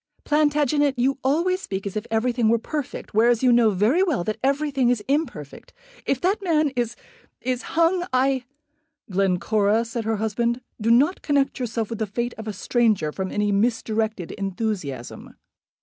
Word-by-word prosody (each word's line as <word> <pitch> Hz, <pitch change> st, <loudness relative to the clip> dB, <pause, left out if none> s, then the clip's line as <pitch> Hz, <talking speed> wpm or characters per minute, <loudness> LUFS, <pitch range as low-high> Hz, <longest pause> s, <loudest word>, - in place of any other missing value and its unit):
"Plantagenet, 290 Hz, -2 st, +2 dB
you 265 Hz, +3 st, +1 dB
always 340 Hz, +8 st, +1 dB
speak 195 Hz, -, -5 dB
as 200 Hz, -, -5 dB
if 215 Hz, +1 st, -3 dB
everything 230 Hz, 0 st, +1 dB
were 230 Hz, -, +4 dB
perfect, 290 Hz, +4 st, -5 dB
whereas 230 Hz, +3 st, +3 dB
you 250 Hz, -, +5 dB
know 235 Hz, -2 st, +5 dB
very 215 Hz, -, +2 dB
well 315 Hz, -, +1 dB
that 215 Hz, +4 st, -3 dB
everything 275 Hz, -2 st, +1 dB
is 240 Hz, -4 st, 0 dB
imperfect. 260 Hz, -, -3 dB, 0.3 s
If 275 Hz, -, +1 dB
that 390 Hz, +4 st, +1 dB
man 310 Hz, -6 st, +2 dB
is 240 Hz, -1 st, -1 dB, 0.4 s
is 255 Hz, 0 st, -2 dB, 0.2 s
hung, 350 Hz, +2 st, +3 dB
I 260 Hz, 0 st, +1 dB, 0.3 s
" 320 Hz, -6 st, -24 dB
"Glencora," 200 Hz, +4 st, +1 dB
said 230 Hz, -1 st, -4 dB
her 225 Hz, 0 st, 0 dB
husband, 235 Hz, +3 st, -1 dB, 0.2 s
"do 220 Hz, -, +1 dB
not 280 Hz, +10 st, +4 dB
connect 280 Hz, -2 st, +1 dB
yourself 230 Hz, -2 st, -3 dB
with 230 Hz, -, -4 dB
the 220 Hz, -, -1 dB
fate 235 Hz, +4 st, -3 dB
of 220 Hz, -, -7 dB
a -, -, -1 dB
stranger 210 Hz, -6 st, +1 dB
from 190 Hz, +3 st, -4 dB
any 210 Hz, 0 st, 0 dB
misdirected 220 Hz, -2 st, 0 dB
enthusiasm." 195 Hz, -, -4 dB
235 Hz, 165 wpm, -23 LUFS, 215-280 Hz, 0.4 s, you